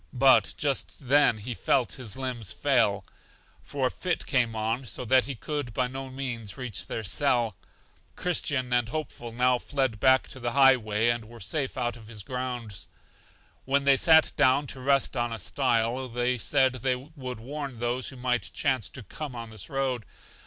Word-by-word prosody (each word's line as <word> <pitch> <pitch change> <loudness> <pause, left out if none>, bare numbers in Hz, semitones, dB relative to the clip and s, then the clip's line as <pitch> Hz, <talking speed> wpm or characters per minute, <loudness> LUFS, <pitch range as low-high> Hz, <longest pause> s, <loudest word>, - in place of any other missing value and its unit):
But 125 -5 +5
just 140 -3 -1
then 140 -5 +5
he 115 +4 -5
felt 125 +2 +1
his 120 -3 -5
limbs 125 -6 -3
fail, 115 -9 +2 0.6
for 140 -2 -3
a 125 - +1
fit 180 -2 -2
came 120 -5 +1
on 110 +2 0
him, 135 - -13
so 125 - -3
that 130 +2 +4
he 140 - -4
could 145 -2 -4
by 125 - +2
no 135 +1 -6
means 125 -5 -5
reach 125 -7 -3
their 115 - -4
cell. 120 -1 +1 0.6
Christian 140 -7 0
and 120 -2 +2
Hopeful 120 -5 -5
now 125 +1 +2
fled 130 -6 -1
back 130 +1 +4
to 130 - -10
the 120 -1 -2
high 135 -1 +7
way, 110 0 +1
and 120 -2 -3
were 115 +1 -13
safe 130 +9 -2
out 120 -1 -1
of 110 -2 -14
his 110 -3 -8
grounds. 120 -7 -4 0.8
When 140 +1 +2
they 140 0 +6
sat 160 +3 +6
down 140 0 +4
to 130 - -10
rest 135 0 +2
on 120 -1 -1
a 115 - -3
stile, 120 +3 0
they 125 +1 -1
said 130 +1 +3
they 130 +1 0
would 130 -2 -8
warn 140 +1 -6
those 120 +2 -1
who 135 - -7
might 125 -6 -1
chance 130 -8 0
to 130 - -10
come 135 +6 -7
on 115 -1 -7
this 105 -2 -8
road. 130 -5 -1
125 Hz, 190 wpm, -27 LUFS, 115-135 Hz, 0.8 s, high